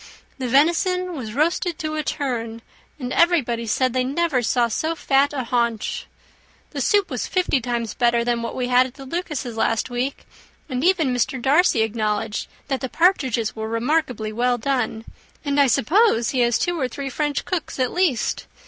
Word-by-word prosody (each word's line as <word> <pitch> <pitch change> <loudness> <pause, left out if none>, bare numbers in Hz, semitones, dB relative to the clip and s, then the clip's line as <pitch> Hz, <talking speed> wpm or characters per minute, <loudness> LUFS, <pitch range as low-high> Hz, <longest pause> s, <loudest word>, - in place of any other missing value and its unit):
The 255 - -2
venison 345 +7 +2
was 230 -6 -6
roasted 335 +3 0
to 310 0 -3
a 310 - -1
turn 230 -6 -3 0.4
and 255 -1 -4
everybody 245 -10 +2
said, 255 +3 +1
they 255 -1 +1
never 280 0 0
saw 240 +1 +2
so 315 +9 -2
fat 280 -2 +2
a 275 -3 -3
haunch. 235 -2 -1 0.6
The - - -4
soup 410 -2 +2
was - - -2
fifty 360 -8 +1
times 235 -2 -2
better 235 -1 +2
than 240 0 0
what 230 - -4
we 250 -1 -1
had 250 +1 +4
at 255 - -15
the 270 - -10
Lucases' 290 -6 -4
last 225 +2 0
week; 250 +3 -3 0.4
and 255 -2 -3
even 335 -7 +3
Mr. 250 +2 0
Darcy 270 -2 +3
acknowledged 215 -1 -2 0.2
that 270 -2 -2
the 260 - -3
partridges 260 - +1
were 220 0 -4
remarkably 230 -2 -1
well 245 +2 +1
done; 225 -3 -2 0.4
and 285 0 +1
I 280 - +6
suppose 280 - +3
he 260 - -1
has 240 -1 +3
two 350 -1 -1
or 260 - 0
three 270 +2 -6
French 295 +1 -1
cooks 365 -5 -3
at 255 -2 0
least. 345 -11 0
255 Hz, 180 wpm, -22 LUFS, 235-310 Hz, 0.6 s, I